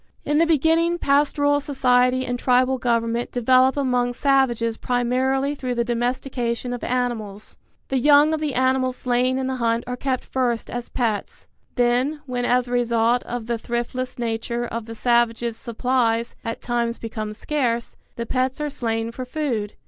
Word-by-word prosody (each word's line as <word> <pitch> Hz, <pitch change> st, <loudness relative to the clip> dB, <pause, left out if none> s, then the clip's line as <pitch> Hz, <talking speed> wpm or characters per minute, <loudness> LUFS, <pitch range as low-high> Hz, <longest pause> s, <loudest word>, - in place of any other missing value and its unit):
In 295 Hz, +1 st, +2 dB
the 335 Hz, -, +4 dB
beginning 330 Hz, +2 st, +3 dB
pastoral 290 Hz, -1 st, +2 dB
society 255 Hz, -2 st, +2 dB
and 245 Hz, 0 st, -3 dB
tribal 255 Hz, +1 st, +2 dB
government 235 Hz, 0 st, 0 dB
develop 255 Hz, +2 st, +3 dB
among 250 Hz, -3 st, +1 dB
savages 245 Hz, -4 st, +2 dB
primarily 260 Hz, +4 st, 0 dB
through 255 Hz, -3 st, -3 dB
the 235 Hz, -, +1 dB
domestication 245 Hz, 0 st, -2 dB
of 245 Hz, -, -6 dB
animals. 230 Hz, -5 st, -3 dB, 0.3 s
The 265 Hz, -, +1 dB
young 295 Hz, +3 st, +5 dB
of 315 Hz, -, 0 dB
the 300 Hz, -3 st, -2 dB
animals 260 Hz, 0 st, +1 dB
slain 250 Hz, +1 st, +1 dB
in 265 Hz, -, -1 dB
the 260 Hz, 0 st, -2 dB
hunt 230 Hz, -1 st, 0 dB
are 250 Hz, -, -4 dB
kept 260 Hz, 0 st, -2 dB
first 245 Hz, -3 st, -1 dB
as 240 Hz, 0 st, -5 dB
pets: 225 Hz, -5 st, -2 dB, 0.3 s
then, 250 Hz, +5 st, +1 dB
when 245 Hz, -2 st, -2 dB
as 250 Hz, 0 st, +2 dB
a -, -, -8 dB
result 240 Hz, 0 st, +2 dB
of 240 Hz, -1 st, -4 dB
the 235 Hz, 0 st, -2 dB
thriftless 240 Hz, +2 st, -3 dB
nature 235 Hz, 0 st, -2 dB
of 230 Hz, -1 st, -5 dB
the 225 Hz, -, -7 dB
savages 235 Hz, -1 st, +1 dB
supplies 235 Hz, 0 st, 0 dB
at 230 Hz, -1 st, -5 dB
times 235 Hz, -1 st, -1 dB
become 215 Hz, -2 st, -5 dB
scarce, 235 Hz, 0 st, -2 dB, 0.2 s
the 235 Hz, -, -4 dB
pets 255 Hz, +3 st, -1 dB
are 300 Hz, -1 st, -2 dB
slain 225 Hz, -2 st, -2 dB
for 255 Hz, +2 st, -6 dB
food. 250 Hz, -6 st, -3 dB
245 Hz, 165 wpm, -23 LUFS, 235-265 Hz, 0.3 s, young